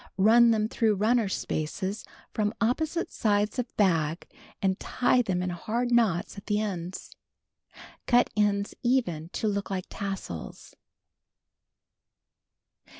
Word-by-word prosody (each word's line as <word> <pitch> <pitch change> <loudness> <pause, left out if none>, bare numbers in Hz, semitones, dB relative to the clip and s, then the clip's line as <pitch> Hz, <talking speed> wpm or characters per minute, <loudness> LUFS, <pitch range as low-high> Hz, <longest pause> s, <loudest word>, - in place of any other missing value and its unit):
Run 230 +4 +6
them 215 -1 +2
through 220 -1 +1
runner 220 +1 +2
spaces 185 +5 -3 0.3
from 210 +1 0
opposite 310 +8 0
sides 210 +2 +1
of 250 - -1
bag 165 -5 +1 0.3
and 190 -1 0
tie 250 0 +2
them 185 -6 -1
in 180 - -2
hard 235 +8 -2
knots 210 -5 +1
at - - -20
the 210 0 +1
ends. 185 -4 -5 0.9
Cut 245 0 +4
ends 205 -1 +1
even 205 -11 0
to 220 - -1
look 200 -1 -2
like 185 -2 -3
tassels. 195 - -6
210 Hz, 120 wpm, -27 LUFS, 185-230 Hz, 0.9 s, Run